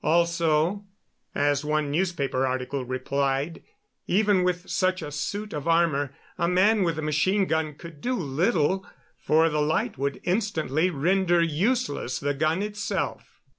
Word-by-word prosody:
Also, 170 +2 +2 0.5
as 145 0 +1
one 150 -1 0
newspaper 145 -6 0
article 130 +1 -2
replied, 135 +4 -1 0.5
even 200 -1 +3
with 180 0 -1
such 185 -1 0
a 150 - -6
suit 205 +9 -4
of 150 +1 -4
armor 165 -5 +2 0.3
a 170 - +2
man 200 +5 +3
with 165 -3 0
a 155 - -3
machine 185 +7 +2
gun 160 -3 -1
could 160 -2 -12
do 255 +1 0
little, 175 - +1 0.4
for 160 +1 +3
the 150 -2 0
light 150 -5 0
would 140 0 -2
instantly 180 - 0
render 175 +3 +2
useless 170 - 0
the 145 0 -1
gun 155 +6 0
itself. 210 0 -4
160 Hz, 140 wpm, -26 LUFS, 145-185 Hz, 0.5 s, even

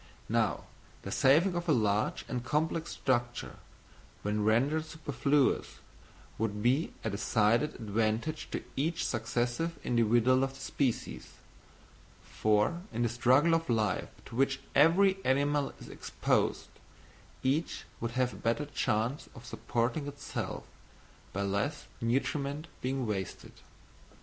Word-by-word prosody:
Now - - +1 0.4
the - - -5
saving 160 +8 +4
of 175 0 -2
a - - +6
large 105 -3 +1
and 125 -1 -3
complex 160 +4 0
structure, 120 -2 -1 0.7
when 105 +1 0
rendered 135 +9 +2
superfluous, 145 -3 +1 0.6
would 105 -1 -1
be 130 +7 +2
a 110 - -1
decided 110 +7 +2
advantage 110 +7 -1
to - - -4
each 165 +5 0
successive 120 +7 -1
individual 120 +2 +3
of 135 0 -2
the - - -12
species; 130 -5 -2 0.9
for 110 +11 +1
in 120 +1 -1
the 120 - +2
struggle 130 +8 +4
for 165 -7 -2
life 110 -2 0 0.2
to - - -10
which 135 +1 +2
every 190 +6 +5
animal 145 +2 +2
is - - -10
exposed, - - -1 0.7
each 140 +6 0 0.2
would 115 0 -3
have 125 0 +1
a - - -9
better 115 +6 0
chance 120 -1 -1
of 120 -1 -11
supporting 120 +5 -1
itself, 145 0 -5 0.7
by 100 - -2
less 100 +10 -1 0.2
nutriment 140 +5 -1 0.2
being 130 0 -1
wasted. 100 -4 -4
130 Hz, 125 wpm, -31 LUFS, 115-145 Hz, 0.9 s, a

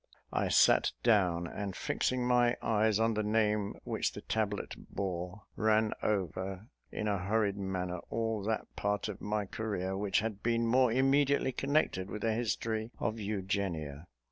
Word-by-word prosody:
I - - +1
sat - - +5
down, 90 -7 +3
and 100 +2 -5
fixing 125 -1 0
my 120 -1 +3
eyes 110 -1 +2
on 115 0 +3
the 110 - 0
name 105 -1 +1
which - - -1
the - - -7
tablet 105 -2 -2 0.2
bore, 90 +1 -4
ran 110 0 +2
over, 95 +1 -2 0.2
in 105 - -3
a 100 -2 +1
hurried 100 +1 +1
manner, 90 -2 -3
all 115 -2 -1
that 110 0 -1
part 105 +1 -1
of 105 - -7
my 105 0 -1
career 95 -2 -3
which 100 -1 +1
had 105 -2 -4
been 115 0 +1
more 125 +1 +4
immediately 135 +2 +3
connected 135 -8 0
with 105 - -5
the 115 -1 +2
history 110 -1 -1
of 110 0 -2
Eugenia. 95 -7 -3
105 Hz, 155 wpm, -32 LUFS, 95-115 Hz, 0.2 s, sat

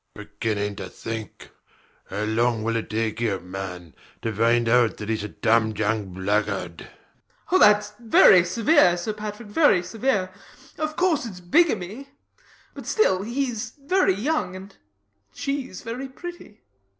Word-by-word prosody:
Beginning 105 -2 -3
to 95 -2 -6
think! 110 +2 -7 0.6
How 100 +2 -3
long 110 +1 +1
will 115 +1 -1
it 115 - -3
take 110 +1 -2
you, 105 -5 0
man, 90 -2 -7 0.3
to 115 - -2
find 115 +2 +2
out 120 -1 +3
that 105 - -7
he's 110 -2 -1
a - - -3
damned 110 0 +1
young 105 -2 -1
blackguard? 95 -2 -1
BLENKINSOP. - - -19
Oh, 370 - +5 0.6
thats 175 -2 +7
severe, 215 - +4
Sir 195 +5 -3
Patrick, 210 +1 -7
very 205 - +4
severe. 200 -1 -1 0.5
Of 310 0 -2
course 325 -8 +1
it's 190 -5 -9
bigamy; 225 - +1 0.6
but - - -10
still 190 - +2
he's 235 -1 -3
very 290 - +2
young; 210 - -1
and 190 +1 -11 0.6
she's 275 -9 -4
very 250 +4 -5
pretty. 345 -6 -10
175 Hz, 140 wpm, -24 LUFS, -, 0.6 s, thats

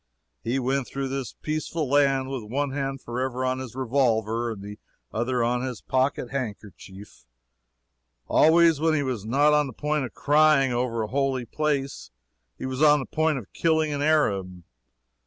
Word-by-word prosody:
He 120 +3 -1
went 135 0 -1
through 135 -1 -4
this 135 -2 -4
peaceful 155 0 -2
land 135 -1 +2
with 135 -2 -4
one 135 +6 -2
hand 135 -1 -3
forever 130 +1 -3
on 130 0 -1
his 130 -3 -8
revolver, 120 -3 0
and 105 -3 -7
the 105 +1 -9 0.3
other 120 +2 0
on 120 +1 0
his 125 -3 -4
pocket 130 -1 0
handkerchief. 105 - -7 1.0
Always, 165 -1 +5
when 160 0 +2
he 145 - +1
was 125 -6 -3
not 145 +6 +3
on 150 -1 +3
the 130 - -8
point 150 -1 -1
of 115 - -10
crying 150 -2 +4
over 120 -2 -1
a - - -3
holy 135 0 -1
place, 140 +1 -2 0.5
he - - -6
was 130 +1 -4
on 150 -1 +6
the 135 - -4
point 160 -2 0
of 115 -6 -9
killing 160 -2 +1
an 145 - -3
Arab. 100 - +1
130 Hz, 170 wpm, -25 LUFS, 120-145 Hz, 1.0 s, on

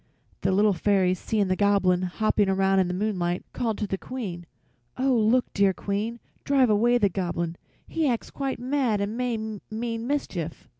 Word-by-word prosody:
The 190 - +1
little 205 +2 +4
fairies, 185 -1 +2
seeing 210 -3 0
the 185 - +1
Goblin 195 -3 +3
hopping 200 +2 +1
about 195 0 +3
in 185 - +2
the 180 - -2
moonlight, 180 -3 -1
called 225 -3 -1
to 210 - -2
the 195 -1 -3
Queen: 190 -10 -6 0.5
"Oh, 265 +1 +2
look, 235 +2 +3
dear 200 -1 +3
Queen. 215 +4 -3 0.2
Drive 265 -5 +3
away 235 +4 +4
the 210 -4 +3
Goblin; 170 -3 -2 0.3
he 320 -2 0
acts 235 -2 -2
quite 275 -1 -3
mad 250 -4 0
and 200 +2 -2
may 245 -1 -1 0.3
mean 230 +1 -3
mischief." 180 - -3
205 Hz, 170 wpm, -26 LUFS, 190-235 Hz, 0.5 s, little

